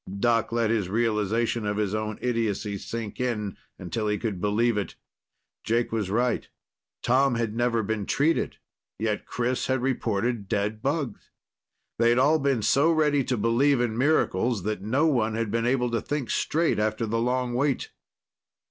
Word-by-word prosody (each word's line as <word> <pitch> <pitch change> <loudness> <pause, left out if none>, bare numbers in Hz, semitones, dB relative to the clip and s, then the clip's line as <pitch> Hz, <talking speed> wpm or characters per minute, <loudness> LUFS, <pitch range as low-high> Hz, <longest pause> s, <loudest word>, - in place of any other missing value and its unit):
Doc 115 0 +2
let 115 -1 +1
his 105 -6 0
realization 115 +1 0
of 105 0 -1
his 105 -2 0
own 110 0 -2
idiocy 115 -4 -1
sink 115 0 -6
in 105 -6 -2 0.2
until 105 +5 -3
he 105 0 +1
could 105 -6 -3
believe 110 +3 +2
it. 105 -1 -3 0.7
Jake 115 +1 0
was 110 -4 -1
right. 120 +4 0 0.5
Tom 130 +1 +3
had 115 -2 -2
never 120 -1 +1
been 105 -1 -2
treated, 155 +4 +1 0.4
yet 105 0 -2
Chris 125 +1 -1
had 130 -1 0
reported 115 -4 -1
dead 105 0 -1
bugs. 140 -4 -2 0.7
They'd 120 +1 +4
all 150 +5 +4
been 135 -5 +1
so 145 +9 +4
ready 150 -3 +2
to 125 - -1
believe 120 +6 +3
in 120 -2 0
miracles 120 - +1
that 105 -2 -2
no 130 +10 +1
one 115 -8 +1
had 115 -2 -2
been 115 +1 0
able 125 -1 +1
to 115 - 0
think 145 -4 -3
straight 155 -8 +1
after 110 +1 0
the 115 +1 -1
long 125 0 0
wait. 135 +2 0
115 Hz, 165 wpm, -26 LUFS, 105-125 Hz, 0.7 s, They'd